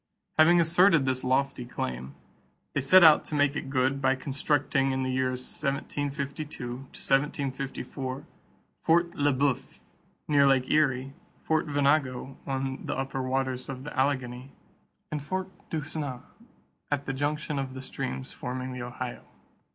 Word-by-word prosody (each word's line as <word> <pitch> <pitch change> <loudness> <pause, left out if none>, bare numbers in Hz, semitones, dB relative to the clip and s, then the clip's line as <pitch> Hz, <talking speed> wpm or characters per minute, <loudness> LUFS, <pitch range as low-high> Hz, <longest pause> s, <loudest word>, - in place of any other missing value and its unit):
Having 170 +2 +7
asserted 170 -2 +5
this 130 -1 0
lofty 130 0 +1
claim, 65 - -5 0.6
they 145 - +1
set 180 +7 +7
out 155 -2 +8
to 150 - -4
make 145 0 +3
it 135 - -4
good 135 +1 +1
by 130 0 +3
constructing 140 0 0
in 130 0 0
the 130 - -1
years 130 -1 0
1752 140 -1 -3
1754 135 0 -2 0.6
Fort 170 +1 +3
Le 145 0 +2
Boeuf 135 -1 0 0.5
near 140 -2 +5
Lake 130 -2 +3
Erie, 135 -3 +2 0.3
Fort 160 0 +1
Venango 140 -2 +1
on 135 -1 -2
the - - -2
upper 135 0 -2
waters 130 0 -1
of 130 -1 -6
the 150 - -7
Allegheny, 130 -2 -1 0.6
and 150 -1 -2
Fort 185 +6 -3 0.2
Duquesne 150 -5 -4 0.7
at 145 -1 -1
the 135 - -2
junction 150 +1 -1
of 130 -1 -4
the 130 - -6
streams 65 - -4
forming 130 +1 -5
the 125 - -5
Ohio. 125 0 -5
135 Hz, 140 wpm, -28 LUFS, 130-145 Hz, 0.7 s, out